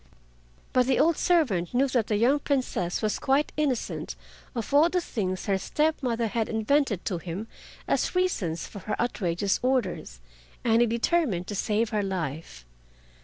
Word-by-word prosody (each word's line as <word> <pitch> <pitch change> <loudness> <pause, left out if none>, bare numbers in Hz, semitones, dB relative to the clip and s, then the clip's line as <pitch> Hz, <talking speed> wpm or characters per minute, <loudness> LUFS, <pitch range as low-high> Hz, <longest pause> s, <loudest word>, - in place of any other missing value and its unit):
But 250 -1 +3
the 265 - +3
old 330 +2 +4
servant 245 - +1
knew 270 +3 +4
that 240 -4 +1
the 215 - +1
young 250 +7 +3
Princess 250 -11 -1
was 215 - 0
quite 275 +2 +2
innocent 285 -6 -2 0.4
of 230 +3 -4
all 305 +4 +6
the 360 - +1
things 185 - -3
her 195 -2 +1
step 305 +10 0
mother 235 -3 0
had 225 0 -1
invented 220 - +1
to 180 -4 -1
him 180 +6 -5 0.4
as - - 0
reasons 205 - 0
for 205 - -9
her 210 - -4
outrageous 195 -5 0
orders, 240 - -1 0.4
and 230 0 +4
he 240 - +4
determined 235 - +1
to 205 - -3
save 215 +3 0
her 210 -2 +1
life. 160 - -4
230 Hz, 165 wpm, -27 LUFS, 190-275 Hz, 0.4 s, all